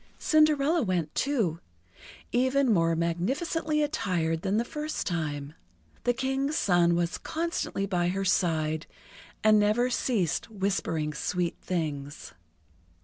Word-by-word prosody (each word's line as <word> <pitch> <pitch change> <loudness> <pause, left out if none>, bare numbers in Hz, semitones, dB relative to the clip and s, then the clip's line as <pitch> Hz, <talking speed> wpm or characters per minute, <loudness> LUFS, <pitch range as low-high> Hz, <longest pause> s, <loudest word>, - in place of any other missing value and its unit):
Cinderella 310 0 +3
went, 180 - -1
too, 220 - 0 0.7
even 260 0 +3
more 165 -3 +2
magnificently 275 - 0
attired 170 - -1
than 195 +2 0
the 235 - +1
first 300 +4 -4
time. 150 -4 -3 0.5
The 245 - +3
King's 270 +4 -1
son 175 - +3
was 170 0 -1
constantly 330 - -2
by 180 -3 0
her 195 +2 -1
side, 160 -4 +1 0.6
and 215 0 +6
never 220 +5 +2
ceased 200 - 0
whispering 190 -7 -1
sweet 175 +4 -2
things. 150 -5 -4
195 Hz, 115 wpm, -28 LUFS, 165-265 Hz, 0.7 s, and